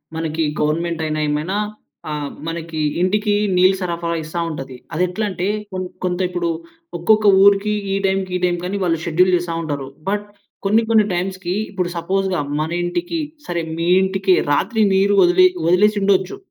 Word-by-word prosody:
మనకి 160 0 -2 0.2
గవర్నమెంట్ 165 +2 0
అయినా 155 0 -2
ఏమైనా 150 +7 -1 0.5
ఆహ్, 145 -1 -4 0.2
మనకి 165 -1 -5 0.2
ఇంటికి 205 +3 +1 0.2
నీళ్లు 185 +1 +5
సరఫరా 170 -1 -2
ఇస్తా 160 +2 -5
ఉంటది. 135 -4 -6 0.2
అదెట్లంటే 180 +2 -1 0.3
కొం 185 0 -2 0.2
కొంత 180 -1 -1
ఇప్పుడు, 175 -1 -2 0.5
ఒక్కొక్క 215 +5 +3 0.2
ఊరికి 200 +1 +4 0.2
ఈ - - +1
టైంకి 190 -1 0
ఈ - - -6
టైంకి 175 0 -1
అని 200 - -2
వాళ్ళు 165 -3 +1
షెడ్యూల్ 180 +3 +3
చేస్తా 175 -1 -2
ఉంటారు. 145 -4 -4 0.2
బట్ 205 +1 -1 0.4
కొన్ని, 215 +3 +3
కొన్ని 220 -2 +5
టైమ్స్‌కి 185 0 -2 0.2
ఇప్పుడు 180 -3 -2
సపోస్‌గా 190 0 0 0.2
మన 155 - -2
ఇంటికి, 175 - -2 0.3
సరే 170 -1 -2
మీ 165 +1 -1 0.2
ఇంటికి 190 0 +2 0.2
రాత్రి 215 +9 +2
నీరు 200 +1 +3
వదిలేయ్ 180 +1 +5
వదిలేసి 210 +4 +4
ఉండొచ్చు. 190 - +1
180 Hz, 155 wpm, -20 LUFS, 170-195 Hz, 0.5 s, నీళ్లు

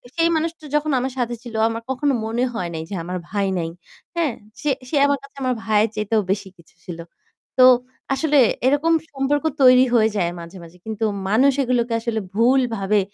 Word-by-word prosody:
সেই 335 0 +3
মানুষটা 320 -1 -4
যখন 300 0 +1
আমার 260 0 -3
সাথে 240 0 -1
ছিল 235 -2 -9
আমার 230 0 -4
কখনো 280 +1 0
মনে 235 +3 -1
হয় 180 -6 -3
নাই 160 - -4
যে 200 - -4
আমার 180 +1 -4
ভাই 200 -1 0
নাই। 165 -1 -2 0.5
হ্যাঁ? 320 -8 0 0.3
সে 295 - 0 0.2
সে - - -2
আমার 285 0 +2
কাছে 275 0 -15
আমার 255 -1 +1
ভাইয়ের 215 0 +2
চাইতেও 215 +1 +1
বেশি 200 0 -2
কিছু 170 - -22
ছিল। 170 -2 -7 0.6
তো 255 - +7 0.5
আসলে 295 +1 +1 0.3
এরকম 295 +4 +3 0.2
সম্পর্ক 285 +2 0 0.2
তৈরি 255 0 +7
হয়ে 220 -1 +4
যায় 175 -2 0
মাঝে, 170 +3 -10
মাঝে। 170 +2 -14
কিন্তু 220 0 -2 0.2
মানুষ 260 +6 +4
এগুলোকে 240 -2 0
আসলে 225 -2 -2
ভুলভাবে 225 -4 +2
235 Hz, 185 wpm, -21 LUFS, 210-275 Hz, 0.6 s, তো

